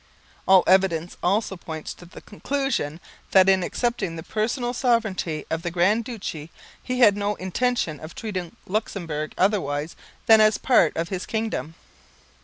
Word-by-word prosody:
All 190 Hz, -1 st, +7 dB
evidence 180 Hz, -3 st, +2 dB
also 195 Hz, +2 st, 0 dB
points 160 Hz, -3 st, -7 dB
to 175 Hz, -, -15 dB
the -, -, -12 dB
conclusion 235 Hz, -, -2 dB, 0.3 s
that 190 Hz, -1 st, +7 dB
in 190 Hz, -1 st, +4 dB
accepting 210 Hz, -2 st, -2 dB
the 160 Hz, -, -7 dB
personal 240 Hz, -, -2 dB
sovereignty 220 Hz, -, 0 dB
of 160 Hz, 0 st, -1 dB
the 175 Hz, -, -3 dB
Grand 190 Hz, +6 st, +2 dB
Duchy 180 Hz, -10 st, -6 dB, 0.3 s
he 255 Hz, 0 st, -3 dB
had 210 Hz, -4 st, +7 dB
no 205 Hz, 0 st, -1 dB
intention 190 Hz, -, -1 dB
of 155 Hz, -, -10 dB
treating 185 Hz, -6 st, -5 dB
Luxemburg 170 Hz, -7 st, -3 dB
otherwise 165 Hz, -6 st, 0 dB, 0.3 s
than 220 Hz, -1 st, +7 dB
as 215 Hz, 0 st, +4 dB
part 210 Hz, -, +3 dB
of 165 Hz, +1 st, -2 dB
his 185 Hz, -2 st, -4 dB
kingdom. 220 Hz, -8 st, -3 dB
190 Hz, 150 wpm, -24 LUFS, 165-220 Hz, 0.3 s, All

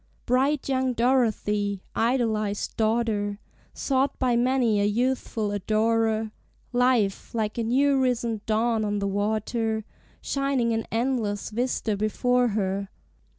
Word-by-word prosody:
Bright 265 Hz, +3 st, +1 dB
young 260 Hz, -1 st, +1 dB
Dorothy, 215 Hz, -5 st, +1 dB
idolized 220 Hz, -4 st, 0 dB
daughter, 215 Hz, -2 st, 0 dB, 0.4 s
Sought 270 Hz, 0 st, 0 dB
by 250 Hz, -2 st, +1 dB
many 240 Hz, -3 st, +2 dB
a -, -, +2 dB
youthful 225 Hz, -1 st, 0 dB
adorer, 220 Hz, +2 st, +1 dB, 0.4 s
Life, 245 Hz, -5 st, +1 dB
like 215 Hz, 0 st, -1 dB
a -, -, 0 dB
new 270 Hz, +4 st, +3 dB
risen 235 Hz, -4 st, 0 dB
dawn 225 Hz, 0 st, +1 dB
on 205 Hz, -1 st, -1 dB
the 200 Hz, -, -1 dB
water, 220 Hz, +2 st, -1 dB, 0.3 s
Shining 275 Hz, -4 st, 0 dB
an 225 Hz, 0 st, -2 dB
endless 225 Hz, -4 st, -1 dB
vista 235 Hz, -2 st, -1 dB
before 245 Hz, +4 st, +1 dB
her! 195 Hz, 0 st, -1 dB
225 Hz, 115 wpm, -26 LUFS, 210-250 Hz, 0.4 s, new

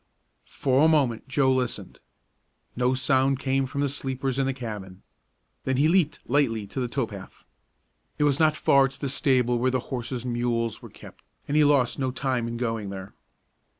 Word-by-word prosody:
For 135 Hz, +1 st, +1 dB
a -, -, +6 dB
moment 140 Hz, -8 st, +1 dB
Joe 130 Hz, 0 st, +2 dB
listened. 130 Hz, -2 st, -3 dB, 0.8 s
No 125 Hz, +1 st, +1 dB
sound 130 Hz, +1 st, +2 dB
came 135 Hz, 0 st, 0 dB
from 140 Hz, +2 st, -3 dB
the 145 Hz, -, +2 dB
sleepers 135 Hz, -1 st, -3 dB
in 135 Hz, -, +1 dB
the -, -, +1 dB
cabin. 105 Hz, -7 st, -8 dB, 0.6 s
Then 130 Hz, -1 st, 0 dB
he 145 Hz, +3 st, +4 dB
leaped 160 Hz, -4 st, +1 dB
lightly 120 Hz, -6 st, +1 dB
to 100 Hz, -, -6 dB
the 125 Hz, -, -1 dB
tow 130 Hz, +1 st, -1 dB
path. 100 Hz, -3 st, -11 dB, 0.7 s
It -, -, +1 dB
was 145 Hz, -1 st, +2 dB
not 155 Hz, -1 st, +3 dB
far 135 Hz, -1 st, +4 dB
to 135 Hz, +1 st, -13 dB
the 140 Hz, -, -2 dB
stable 125 Hz, -3 st, +1 dB
where 130 Hz, +2 st, +2 dB
the 130 Hz, 0 st, 0 dB
horses 125 Hz, 0 st, -4 dB
and 125 Hz, -1 st, -3 dB
mules 120 Hz, -1 st, -1 dB
were -, -, -11 dB
kept, -, -, -15 dB, 0.2 s
and 145 Hz, -, -2 dB
he 155 Hz, -, +5 dB
lost 140 Hz, -4 st, +3 dB
no 130 Hz, -1 st, 0 dB
time 125 Hz, -2 st, -1 dB
in 115 Hz, 0 st, -4 dB
going 115 Hz, -4 st, -2 dB
there. 95 Hz, 0 st, -8 dB
130 Hz, 190 wpm, -26 LUFS, 120-140 Hz, 0.8 s, a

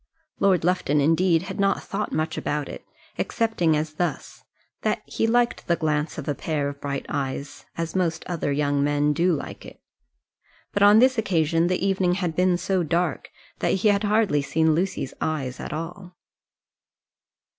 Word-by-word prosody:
Lord 190 Hz, -4 st, +3 dB
Lufton, 175 Hz, -4 st, +1 dB
indeed, 165 Hz, +3 st, +3 dB
had 190 Hz, +1 st, -7 dB
not 195 Hz, 0 st, +1 dB
thought 205 Hz, +2 st, -3 dB
much 155 Hz, +1 st, -1 dB
about 150 Hz, -1 st, -2 dB
it -, -, -8 dB, 0.4 s
excepting 180 Hz, -9 st, +1 dB
as 155 Hz, 0 st, -3 dB
thus, 175 Hz, +3 st, -4 dB, 0.4 s
that -, -, -1 dB
he 225 Hz, -, -1 dB
liked 240 Hz, +1 st, +1 dB
the 170 Hz, -, +3 dB
glance 155 Hz, -2 st, -1 dB
of 150 Hz, -, -6 dB
a 145 Hz, -, +1 dB
pair 145 Hz, 0 st, -2 dB
of 140 Hz, 0 st, -10 dB
bright 140 Hz, -1 st, -3 dB
eyes, 140 Hz, 0 st, -4 dB
as 165 Hz, +1 st, -3 dB
most 170 Hz, -4 st, 0 dB
other 170 Hz, -5 st, -2 dB
young 145 Hz, 0 st, +1 dB
men 145 Hz, 0 st, +2 dB
do 175 Hz, +4 st, +2 dB
like 155 Hz, -, -4 dB
it. -, -, -12 dB, 0.9 s
But, 205 Hz, -, -1 dB
on 205 Hz, +1 st, +7 dB
this 255 Hz, +1 st, +5 dB
occasion, 165 Hz, -4 st, +1 dB
the 180 Hz, +1 st, 0 dB
evening 185 Hz, -2 st, +2 dB
had 180 Hz, -4 st, -2 dB
been 180 Hz, 0 st, +3 dB
so 185 Hz, +1 st, 0 dB
dark, 170 Hz, -2 st, -1 dB, 0.3 s
that -, -, +1 dB
he -, -, +7 dB
had 200 Hz, 0 st, +2 dB
hardly 210 Hz, -8 st, +2 dB
seen 160 Hz, +3 st, +2 dB
Lucy's 175 Hz, -5 st, -2 dB
eyes 135 Hz, -5 st, -2 dB
at -, -, -6 dB
all. 175 Hz, +4 st, -6 dB
165 Hz, 170 wpm, -24 LUFS, 150-190 Hz, 0.9 s, on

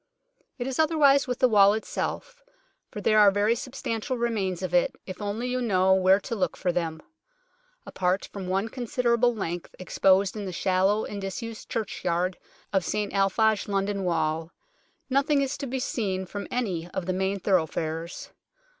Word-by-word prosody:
It 245 Hz, -, -3 dB
is 265 Hz, +1 st, -3 dB
otherwise 295 Hz, -4 st, +4 dB
with 250 Hz, -1 st, -2 dB
the 255 Hz, -, +4 dB
wall 205 Hz, -3 st, +6 dB
itself, -, -, -4 dB, 0.5 s
for 210 Hz, -, -7 dB
there 215 Hz, +1 st, +4 dB
are 205 Hz, -1 st, +8 dB
very 205 Hz, +3 st, +2 dB
substantial 250 Hz, 0 st, -4 dB
remains 200 Hz, -6 st, -1 dB
of 180 Hz, -1 st, -3 dB
it, 175 Hz, -, +2 dB
if 185 Hz, +1 st, -8 dB
only 210 Hz, +4 st, -3 dB
you 250 Hz, 0 st, -1 dB
know 190 Hz, -5 st, +3 dB
where 190 Hz, +1 st, +5 dB
to -, -, -5 dB
look 185 Hz, -5 st, -1 dB
for 180 Hz, -, 0 dB
them. 165 Hz, -2 st, -3 dB, 0.8 s
Apart 185 Hz, +1 st, -1 dB
from 195 Hz, -2 st, -6 dB
one 195 Hz, +3 st, 0 dB
considerable 240 Hz, 0 st, +1 dB
length 175 Hz, -4 st, -5 dB
exposed 190 Hz, +1 st, +2 dB
in 210 Hz, -2 st, -4 dB
the 185 Hz, -, -4 dB
shallow 190 Hz, +4 st, +1 dB
and 205 Hz, -1 st, -6 dB
disused 220 Hz, +4 st, -6 dB
churchyard 180 Hz, -4 st, -2 dB, 0.3 s
of 190 Hz, -2 st, +2 dB
St 210 Hz, +4 st, -2 dB
Alphage 200 Hz, +2 st, +2 dB
London 200 Hz, 0 st, -1 dB
Wall, 160 Hz, -2 st, 0 dB, 0.6 s
nothing 280 Hz, +2 st, +2 dB
is 275 Hz, 0 st, -1 dB
to 280 Hz, -, -4 dB
be 260 Hz, +2 st, -3 dB
seen 195 Hz, -7 st, -2 dB
from 200 Hz, +2 st, -6 dB
any 185 Hz, -9 st, -2 dB
of 185 Hz, -, -2 dB
the 185 Hz, -, -1 dB
main 190 Hz, +2 st, -1 dB
thoroughfares. 165 Hz, -2 st, -1 dB
200 Hz, 165 wpm, -26 LUFS, 185-235 Hz, 0.8 s, are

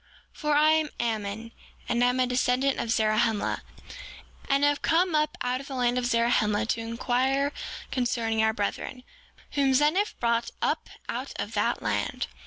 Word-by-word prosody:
For 300 Hz, -1 st, 0 dB
I 305 Hz, +1 st, +5 dB
am 315 Hz, -1 st, +2 dB
Ammon, 220 Hz, -1 st, -3 dB, 0.4 s
and 240 Hz, 0 st, +1 dB
am 250 Hz, +1 st, +2 dB
a 255 Hz, -, +4 dB
descendant 250 Hz, +2 st, +1 dB
of 230 Hz, -, -3 dB
Zarahemla, 220 Hz, -1 st, +1 dB, 0.9 s
and 275 Hz, 0 st, +3 dB
have 290 Hz, 0 st, +3 dB
come 345 Hz, +1 st, +2 dB
up 305 Hz, -1 st, +1 dB
out 250 Hz, +1 st, -1 dB
of 275 Hz, -, -11 dB
the 270 Hz, -, -6 dB
land 245 Hz, 0 st, +1 dB
of 245 Hz, -, -1 dB
Zarahemla 230 Hz, -3 st, +2 dB
to -, -, +1 dB
inquire 255 Hz, +4 st, 0 dB, 0.4 s
concerning 230 Hz, -3 st, 0 dB
our 220 Hz, 0 st, +3 dB
brethren, 220 Hz, +4 st, -4 dB, 0.5 s
whom 275 Hz, -2 st, +2 dB
Zeniff 310 Hz, +10 st, +2 dB
brought 235 Hz, 0 st, +1 dB
up -, -, -1 dB, 0.2 s
out -, -, -4 dB
of -, -, -4 dB
that -, -, 0 dB
land. -, -, -1 dB
250 Hz, 160 wpm, -27 LUFS, 230-280 Hz, 0.9 s, I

